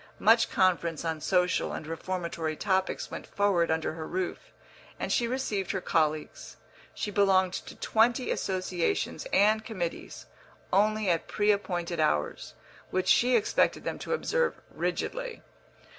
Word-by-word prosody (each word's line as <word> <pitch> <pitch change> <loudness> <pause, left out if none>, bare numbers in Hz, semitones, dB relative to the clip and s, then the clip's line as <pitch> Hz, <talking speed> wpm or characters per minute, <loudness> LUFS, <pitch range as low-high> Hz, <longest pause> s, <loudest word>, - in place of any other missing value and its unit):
Much 225 +2 +4
conference 170 -4 +1
on 160 -1 -2
social 180 +1 +1
and - - -5
reformatory 165 -1 -3
topics 190 +1 -1
went - - -7
forward 195 -4 +1
under 160 0 0
her 160 -1 -6
roof, 185 0 -4 0.5
and - - -1
she 240 - +2
received 220 -7 -2
her 190 - -1
colleagues 155 -3 -1 0.4
she 210 - -3
belonged 190 -2 +3
to - - -6
twenty 235 +3 +2
associations 185 - -1
and 215 +2 +4
committees 185 -7 -5 0.5
only 215 +2 +3
at 170 -2 +1
pre 210 0 +2
appointed 175 -4 -2
hours, 75 - 0 0.3
which 185 0 -1
she 250 +1 +5
expected 220 - +2
them - - -4
to - - -6
observe 485 0 0
rigidly. - - -3
185 Hz, 135 wpm, -28 LUFS, 170-215 Hz, 0.5 s, she